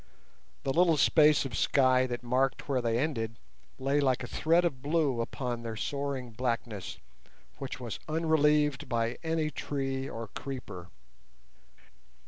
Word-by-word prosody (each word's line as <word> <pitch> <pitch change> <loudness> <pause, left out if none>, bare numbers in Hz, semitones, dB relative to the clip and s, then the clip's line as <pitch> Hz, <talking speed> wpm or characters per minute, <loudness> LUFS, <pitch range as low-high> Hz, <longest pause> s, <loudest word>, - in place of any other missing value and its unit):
The 135 - 0
little 170 -1 +4
space 150 +1 +5
of 125 -3 -4
sky 130 -1 +3
that 120 -1 -4
marked 130 +2 0
where 135 -3 +1
they 115 -1 +1
ended 115 -6 -2 0.4
lay 135 +2 +1
like 130 -3 +1
a - - -5
thread 170 +2 +2
of 135 -7 -2
blue 145 -4 +1
upon 120 0 -3
their 115 -1 -5
soaring 140 0 -3
blackness, 115 -3 -3 0.6
which 135 -1 -5
was 120 -5 -5
unrelieved 150 -2 +2
by 115 0 -1
any 160 -2 -1
tree 135 -2 -3
or 115 -1 -6
creeper. 105 -10 -7
135 Hz, 135 wpm, -30 LUFS, 120-150 Hz, 0.6 s, space